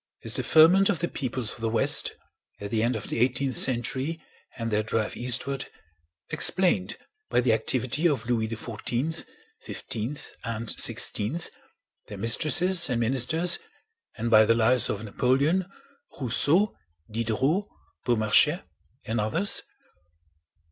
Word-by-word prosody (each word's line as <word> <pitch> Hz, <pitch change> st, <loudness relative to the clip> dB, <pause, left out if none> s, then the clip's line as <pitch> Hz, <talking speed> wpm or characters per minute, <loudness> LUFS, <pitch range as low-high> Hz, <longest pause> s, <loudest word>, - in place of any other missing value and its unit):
Is -, -, +3 dB
the -, -, 0 dB
ferment 175 Hz, +5 st, +5 dB
of 200 Hz, -, +1 dB
the 175 Hz, -, -2 dB
peoples 130 Hz, -6 st, -3 dB
of -, -, -12 dB
the 115 Hz, -, -1 dB
west 115 Hz, -, +2 dB, 0.4 s
at 100 Hz, 0 st, -7 dB
the 110 Hz, -, 0 dB
end 120 Hz, +2 st, 0 dB
of 110 Hz, -, -6 dB
the -, -, -3 dB
eighteenth 130 Hz, +2 st, 0 dB
century 130 Hz, +5 st, 0 dB, 0.4 s
and 115 Hz, -1 st, -4 dB
their 105 Hz, 0 st, +1 dB
drive 110 Hz, 0 st, -3 dB
eastward 130 Hz, +2 st, +1 dB, 0.6 s
explained 170 Hz, -, +2 dB, 0.3 s
by -, -, +2 dB
the 120 Hz, -2 st, +2 dB
activity 130 Hz, +7 st, 0 dB
of 140 Hz, -5 st, -2 dB
Louis 115 Hz, -2 st, 0 dB
XIV, 120 Hz, +7 st, -4 dB, 0.4 s
XV, 120 Hz, +6 st, -6 dB
and 115 Hz, -1 st, -5 dB
XVI, 140 Hz, +12 st, -1 dB, 0.6 s
their -, -, -9 dB
mistresses 170 Hz, +9 st, +3 dB
and 125 Hz, -2 st, -1 dB
ministers, 135 Hz, +9 st, +1 dB, 0.6 s
and 115 Hz, +1 st, -3 dB
by 110 Hz, -1 st, +7 dB
the 115 Hz, +2 st, +2 dB
lives 120 Hz, +2 st, +2 dB
of 105 Hz, +1 st, -4 dB
Napoleon, 140 Hz, -, 0 dB, 0.5 s
Rousseau, 145 Hz, -, +2 dB, 0.4 s
Diderot, 115 Hz, -, -1 dB, 0.4 s
Beaumarchais, 120 Hz, -, +3 dB, 0.4 s
and 110 Hz, 0 st, -2 dB
others? 110 Hz, -, +2 dB
125 Hz, 130 wpm, -26 LUFS, 115-155 Hz, 0.6 s, by